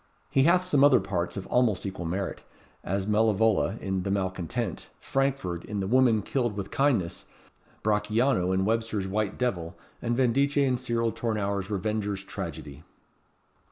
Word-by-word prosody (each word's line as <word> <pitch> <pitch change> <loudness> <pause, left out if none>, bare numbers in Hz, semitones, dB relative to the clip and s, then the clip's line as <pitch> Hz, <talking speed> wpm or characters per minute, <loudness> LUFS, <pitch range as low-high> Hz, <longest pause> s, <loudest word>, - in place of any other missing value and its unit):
He 135 0 +4
hath 180 +2 +4
some 145 -6 +3
other 140 -4 +7
parts 90 -1 -3
of 95 - -5
almost 115 -7 +1
equal 95 -3 -4
merit, 95 +3 -3 0.4
as 95 +1 -1
Malevole, 110 -1 +2
in 95 -1 -2
the 100 - -3
'Malcontent;' 95 -4 -2
Frankford, 135 -11 -1
in 105 -1 -4
the 95 - -1
'Woman 115 -1 +3
Killed 120 -5 -1
with 100 -1 -5
Kindness;' 125 -12 0 0.6
Brachiano, 105 -1 +2
in 95 0 +1
Webster's 110 -3 -1
'White 105 +1 -1
Devil;' 95 -8 -2 0.2
and 120 0 -1
Vendice, 135 +3 +2
in 135 -3 +3
Cyril 115 -2 0
Tournour's 100 -3 -2
'Revenger's 100 -1 -2
Tragedy.'" 70 -6 -7
105 Hz, 145 wpm, -27 LUFS, 95-125 Hz, 0.6 s, other